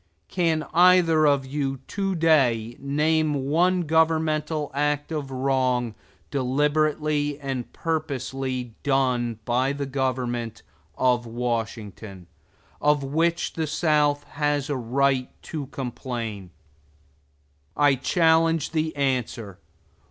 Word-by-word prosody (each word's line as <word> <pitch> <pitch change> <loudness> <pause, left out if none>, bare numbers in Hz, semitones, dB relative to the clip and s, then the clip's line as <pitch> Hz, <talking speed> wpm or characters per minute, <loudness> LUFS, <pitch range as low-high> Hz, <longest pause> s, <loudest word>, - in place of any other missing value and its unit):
Can 165 -4 +1
either 170 -3 +5
of 140 -2 +2
you 135 0 -2
to 195 -2 -1
day 125 -9 +2
name 150 +2 +1
one 170 +7 +2
governmental 155 -1 +1
act 145 +2 -1
of 150 -4 -3
wrong, 130 -3 0 0.4
deliberately 145 +2 0
and 135 -4 -4
purposely 135 -6 -3
done 125 -4 +1
by 130 +3 +1
the 140 0 -3
government 125 -4 -2 0.3
of 125 -2 +2
Washington, 115 -5 -4 0.6
of 150 -1 +3
which 165 +5 0
the 160 -1 -2
South 150 -2 +2
has 145 -1 -1
a - - 0
right 130 +1 +1
to 150 -4 -5
complain? 120 -7 -5 1.3
I 145 -1 +5
challenge 165 +3 +2
the 155 -1 -1
answer. 125 -7 -2
140 Hz, 100 wpm, -24 LUFS, 125-155 Hz, 1.3 s, either